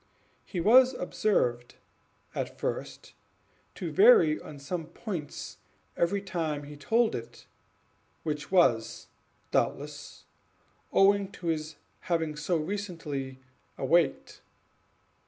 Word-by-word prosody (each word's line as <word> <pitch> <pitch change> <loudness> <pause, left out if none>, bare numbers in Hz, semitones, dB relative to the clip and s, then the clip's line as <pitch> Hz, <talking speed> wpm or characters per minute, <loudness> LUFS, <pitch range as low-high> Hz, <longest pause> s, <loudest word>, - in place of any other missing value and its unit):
He 180 - -5
was 255 +8 +6
observed, 125 - 0 0.6
at - - -4
first, - - -5 0.6
to - - -4
vary 405 -7 +6
on 150 - -10
some 155 +4 -5
points 170 -4 -6 0.4
every 195 +4 0
time 160 -6 -2
he 145 +1 -9
told 225 +11 +2
it, 115 0 -7 0.8
which 150 0 -4
was, 120 -12 +2 0.4
doubtless, - - -2 0.7
owing 200 0 +4
to 170 - -4
his 155 -1 -2 0.2
having 160 -3 -1
so 160 +3 0
recently 155 -7 -4 0.4
awaked. 155 +1 +1
170 Hz, 100 wpm, -29 LUFS, 150-200 Hz, 0.8 s, was